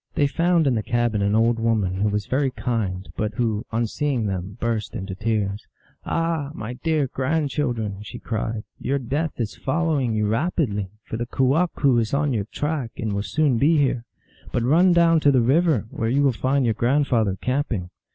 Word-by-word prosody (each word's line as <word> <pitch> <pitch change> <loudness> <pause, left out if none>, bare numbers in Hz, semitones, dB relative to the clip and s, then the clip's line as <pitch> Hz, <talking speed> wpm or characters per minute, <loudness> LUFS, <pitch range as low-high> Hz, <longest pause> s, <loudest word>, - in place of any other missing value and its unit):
They 145 - +3
found 170 +3 +2
in 135 - +3
the 110 - 0
cabin 120 -2 0
an 100 +1 +2
old 115 +1 +3
woman, 110 -5 +1
who 105 - +3
was 105 0 -1
very 135 +3 +1
kind, 100 -8 -2
but 105 0 -2
who, 110 -3 -1
on 115 +1 +1
seeing 130 0 -1
them, 95 +1 -4
burst 115 -3 -2
into 95 0 -4
tears. 105 0 -2 0.2
" - - -36
Ah, 165 -4 -1
my 110 +3 -5
dear 150 +3 0
grand 140 +3 -1
children," 120 -8 -1
1 100 +1 -9
she - - -8
cried, 110 0 -3
" - - -43
your 140 - 0
death 140 +5 -2
is 110 -3 -2
following 140 -5 0
you 105 0 +1
rapidly, 110 - 0
for 110 - -5
the 120 0 -3
kewahqu 135 -1 +2
is 115 +4 0
on 145 -1 +1
your 105 -4 -1
track, 145 +1 -3
and 110 -2 -2
will 100 - -1
soon 140 +1 +1
be 155 +5 +4
here. 130 -4 +1 0.5
But 120 - 0
run 170 +9 +5
down 170 -1 +5
to 145 -2 +4
the 130 - +4
river, 140 - +3
where 115 - -2
you 140 +4 +2
will 140 - +4
find 130 +3 +1
your 115 - +2
grandfather 120 -6 +1
camping." 125 -9 -2
120 Hz, 200 wpm, -23 LUFS, 110-145 Hz, 0.5 s, run